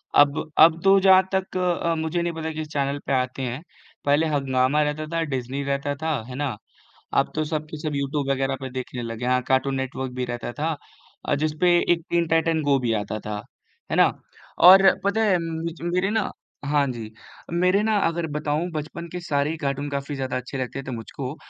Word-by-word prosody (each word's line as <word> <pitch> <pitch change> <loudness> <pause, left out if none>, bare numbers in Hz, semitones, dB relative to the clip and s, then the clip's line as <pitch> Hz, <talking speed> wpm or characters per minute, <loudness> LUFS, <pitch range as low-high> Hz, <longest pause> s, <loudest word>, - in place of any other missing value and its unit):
अब 145 +2 +4
अब 160 +1 +7
तो 195 0 +6
जहाँ 190 0 +6
तक 190 -1 -1
अ, 175 -2 0
मुझे 160 +2 -1
नहीं 170 0 -1
पता 160 0 -4
किस 155 0 -5
चैनल 140 0 -1
पे - - -1
आते 130 +1 -1
हैं। 130 +3 -3 0.4
पहले 145 +3 +3
हंगामा 135 -1 +1
रहता 150 +1 -2
था, 165 - +1
डिज़्नी 135 -2 -3
रहता 140 +1 -1
था, 155 -4 -2
है 125 - -7
ना? 140 -5 -2 0.6
अब - - +2
तो 155 0 0
सब 155 0 -3
के 155 - -6
सब 155 -2 -3
यूट्यूब 140 0 -1
वग़ैरह 135 0 0
पे 130 - -5
देखने 125 -1 -5
लगे 115 +1 -5
हैं। 125 - +2
हाँ 125 0 +2
कार्टून 135 +1 +2
नेटवर्क 130 0 -3
भी 125 0 -2
रहता 120 0 -5
था, 155 +3 -2 0.6
जिस 155 +1 0
पर 175 -1 +5 0.3
टीन 170 0 +2
टाइटन 165 0 +2
गो 140 -2 +3
भी 120 -3 0
आता 110 +1 -4
था, 105 -1 -5 0.5
है - - 0
ना। - - +5 0.6
और 190 +1 +10 0.2
पता 200 +2 +1
है 190 -4 +3
मुझ 165 0 -3
मेरे 180 +3 0
ना 215 -2 0 0.4
हाँ 145 -1 +2
जी। 115 -3 -7 0.4
मेरे 180 +4 +3
ना 215 0 +2
अगर 165 0 -1
बताऊँ 150 +3 -1
बचपन 155 +2 -5
के 180 +2 -6
सारे 150 -4 0
ही 165 - -3
कार्टून 140 -1 -2
काफ़ी 140 +1 -3
ज़्यादा 130 -2 -3
अच्छे 125 +2 -5
लगते 130 +1 -4
थे 135 - -7
मुझको। 125 +5 -6
145 Hz, 205 wpm, -24 LUFS, 130-165 Hz, 0.6 s, और